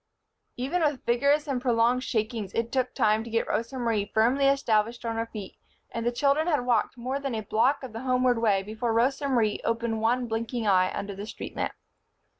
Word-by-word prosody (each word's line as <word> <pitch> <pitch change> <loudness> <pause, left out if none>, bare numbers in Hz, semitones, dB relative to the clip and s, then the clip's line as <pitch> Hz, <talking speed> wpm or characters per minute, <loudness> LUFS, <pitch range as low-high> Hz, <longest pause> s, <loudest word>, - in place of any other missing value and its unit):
Even 275 +8 -1
with 295 -5 0
vigorous 280 +5 +2
and 265 -3 -1
prolonged 245 0 +2
shakings 220 -4 -2
it 230 0 -1
took 255 -1 0
time 215 +1 +2
to 230 - -9
get 230 0 0
Rosa 235 +4 -2
Marie 225 -4 0
firmly 250 +5 +3
established 235 -4 +1
on 230 0 -2
her 225 0 -2
feet, 210 -4 -8 0.3
and 230 - -3
the 240 - +1
children 280 +5 +2
had 295 -7 +1
walked 240 0 +1
more 255 +3 -3
than 275 -4 -3
a 220 - -2
block 250 +8 +1
of 250 -4 -7
the 225 - -5
homeward 255 -2 +2
way 205 -4 +2
before 220 +3 -2
Rosa 270 +5 +1
Marie 225 -5 +1
opened 230 -1 -1
one 245 +3 +1
blinking 230 +1 -3
eye 185 -2 +3
under 200 0 -4
the 200 +2 -7
street - - -8
lamp. - - -2
235 Hz, 205 wpm, -27 LUFS, 220-260 Hz, 0.3 s, firmly